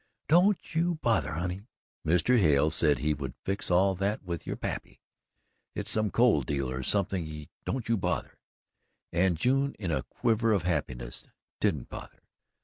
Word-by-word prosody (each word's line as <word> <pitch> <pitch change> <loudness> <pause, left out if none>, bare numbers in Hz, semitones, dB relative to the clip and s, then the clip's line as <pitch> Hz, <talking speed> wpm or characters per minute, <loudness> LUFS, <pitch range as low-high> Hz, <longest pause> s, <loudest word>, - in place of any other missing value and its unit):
"Don't 180 +5 +3
you 170 +2 +1
bother, 115 - 0
honey. 90 +4 -3 0.5
Mr. 90 +10 +4
Hale 75 -4 +4
said 75 -1 +3
he 75 +1 0
would 70 -3 -6
fix 100 +1 -1
all 95 +2 +4
that 100 +3 -2
with 85 -3 -5
your - - -2
pappy. - - -5 0.8
It's 105 +1 0
some 110 -1 +3
coal 115 -10 +4
deal 70 0 -2
or 65 0 -3
something 80 -3 -1 0.2
don't 130 -3 -3
you 115 0 +2
bother!" 95 - -3 0.7
And 90 0 +2
June 135 - +1
in 95 -5 -3
a 70 -4 0
quiver 115 - +1
of 95 -5 +1
happiness 60 -8 -3 0.3
didn't 70 -5 0
bother. - - -10
90 Hz, 155 wpm, -29 LUFS, 75-110 Hz, 0.8 s, Mr